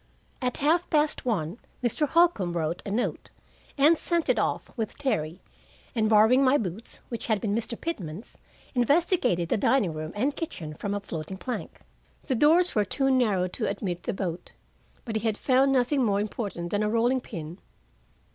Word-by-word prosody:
At 250 -1 -1
half 335 +3 +3
past 300 -4 +1
one 195 -3 -1 0.2
Mr. 245 +5 +1
Holcombe 265 - +3
wrote 165 +1 -2
a - - -2
note, 225 +5 -2 0.5
and 295 +4 +6
sent 335 +1 -1
it - - +3
off - - -2
with 225 -4 -4
Terry, 170 - -2 0.5
and 220 -4 +1
borrowing 220 +5 +6
my 265 +2 +5
boots, 210 - -6
which 235 - -4
had 220 -3 +2
been 200 0 -1
Mr. 230 +1 -3
Pitman's, 200 - -5 0.4
investigated 250 - +2
the - - +2
dining 205 -5 +2
room 155 +1 -5
and 270 +7 0
kitchen 165 - -5
from 200 +6 -3
a - - -1
floating 175 -1 -6
plank; 245 +7 -6 0.4
the 270 - 0
doors 320 +8 +4
were 210 - +3
too 270 +7 0
narrow 210 -8 +2
to - - -2
admit 190 -3 -3
the - - -2
boat. 180 -3 -5 0.5
But 225 -3 -2
he 220 0 0
found 265 +5 +3
nothing 265 +1 +2
more 200 -3 +2
important 200 -5 -4
than 205 - +1
a 210 - +1
rolling 240 +3 +2
pin. 170 -5 -8
220 Hz, 175 wpm, -27 LUFS, 185-270 Hz, 0.5 s, and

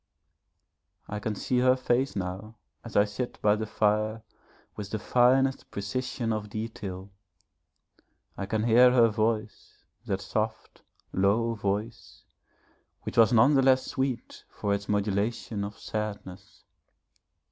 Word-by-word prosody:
I 105 - -4
can 105 0 -3
see 125 +4 0
her 130 +1 +4
face 130 0 0
now 95 +3 -5 0.3
as - - -10
I 100 - +6
sit 105 +4 -5
by 105 0 +3
the 110 0 -4
fire 110 +1 0 0.5
with 105 -2 -6
the 110 - -2
finest 130 +4 +2
precision 115 +3 -3
of 105 -1 -4
detail. 100 -3 -6 1.2
I 100 - -5
can 110 +1 -1
hear 120 +2 +6
her 120 -2 +5
voice, 110 0 -2 0.2
that 95 0 -1
soft, 110 +3 -3 0.3
low 105 +5 +2
voice, 105 +2 -4 0.8
which - - -6
was 115 0 +6
none 120 +5 +5
the 135 - +5
less 130 -1 +4
sweet 130 -2 -3
for 100 - -2
its 100 0 -4
modulation 105 +1 -1
of 100 +1 -6
sadness. 105 -4 -6
110 Hz, 130 wpm, -28 LUFS, 100-120 Hz, 1.2 s, I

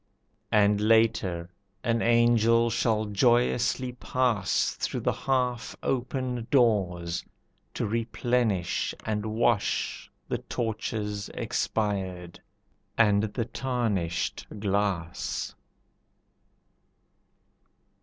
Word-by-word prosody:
And 105 -1 +4
later 105 -6 +2 0.3
an 115 -1 +1
angel 115 0 +4
shall 110 -1 +1
joyously 120 +4 +2
pass 125 -5 0
Through - - -3
the - - +1
half 125 -3 -1
open 125 -2 -2
doors, 90 -9 +2 0.5
to - - -1
replenish 115 -3 0
and 110 0 -1
wash 110 0 0 0.2
The - - -2
torches 110 -3 -3
expired, 95 -5 -2 0.6
and 105 -3 +5
the 110 +2 -2
tarnished 110 -11 -2
glass. 100 -4 -1
110 Hz, 75 wpm, -27 LUFS, 100-120 Hz, 0.6 s, and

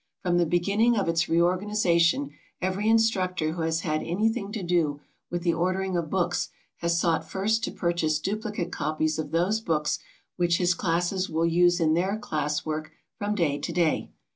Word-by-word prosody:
From 175 -1 +2
the 170 - +2
beginning 200 +8 +2
of 200 - 0
its 165 +1 +1
reorganization 170 -3 +2 0.3
every 190 +4 0
instructor 185 -8 +2
who 170 +1 -4
has 160 0 0
had 155 -2 -1
anything 205 +3 -1
to 210 -3 -4
do 165 -5 +1 0.3
with 175 0 -3
the 170 -2 +2
ordering 185 +2 -1
of 170 -3 -1
books 185 0 0 0.3
has 170 0 0
sought 165 -2 +1
first 220 +4 0
to - - -4
purchase 170 -3 0
duplicate 205 0 -3
copies 155 0 -1
of 155 -2 -3
those 180 +7 +1
books 150 -6 0 0.4
which 175 -1 +2
his 180 0 +2
classes 175 +2 0
will 165 +1 +1
use 175 +1 +3
in 160 -2 +3
their 190 +5 +1
class 150 -7 -2
work 155 0 -3 0.3
from 210 0 -1
day 150 -7 +1
to - - -4
day. 170 -3 0
175 Hz, 175 wpm, -26 LUFS, 165-190 Hz, 0.4 s, use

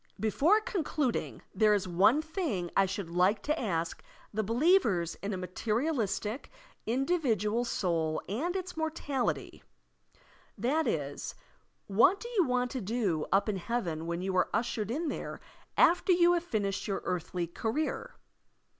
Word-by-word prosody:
Before 295 - +3
concluding, 305 - -2
there 215 -1 +4
is 195 -2 -1
one 205 - +4
thing 310 - -2
I 195 - +4
should 185 -2 -4
like 185 +5 +2
to 305 +2 0
ask 170 -7 -2 0.3
the 220 - 0
believers 230 - +3
in 200 - -3
a 190 - -2
materialistic, 215 - -2 0.4
indi 270 +10 +1
vidual 230 - 0
soul 165 -6 0
and 300 - -2
its 370 -1 -3
immortality; 310 -5 -2 1.0
that 275 +9 +1
is. 145 -2 -3 0.5
What 230 - +4
do 475 - -7
you 415 -8 +2
want 250 -1 0
to 260 - -3
do 195 -7 -1
up 195 +2 +3
in 210 -2 0
heaven 175 -6 -2
when 170 +1 -2
you 190 0 -1
are - - +3
ushered 225 -2 -1
in 310 +8 -1
there - - -4 0.4
after 360 +2 +5
you 350 0 +5
have 345 0 0
finished 200 - -1
yovir 195 - -2
earthly 180 0 -2
career? 295 - -3
225 Hz, 145 wpm, -30 LUFS, 190-310 Hz, 1.0 s, after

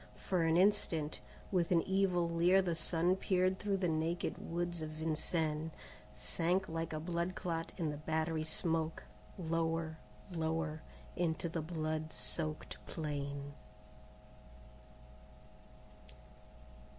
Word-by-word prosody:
For 185 -3 0
an 165 0 +4
instant, 165 -5 +3 0.3
with 175 -4 +2
an 170 -2 +5
evil 190 -3 +2
leer 170 +3 +5
the 175 -2 +1
sun 165 +2 +2
peered 185 0 +2
through 200 -1 +1
the 185 -2 +1
naked 165 +2 0
woods 175 0 -2
of 155 - -3
Vincennes, 155 0 0 0.5
sank 180 +3 0
like 165 0 -2
a 155 - -2
blood 170 +2 -1
clot 165 -2 -2
in 165 -5 0
the 150 - -4
battery 160 +1 0
smoke, 160 0 0 0.3
lower, 165 -1 0 0.3
lower, 160 -2 -1 0.3
into 170 -1 0
the 165 0 -2
blood 155 -1 -2
soaked 150 +9 -3
plain. 145 -2 -3
165 Hz, 115 wpm, -36 LUFS, 155-175 Hz, 0.5 s, an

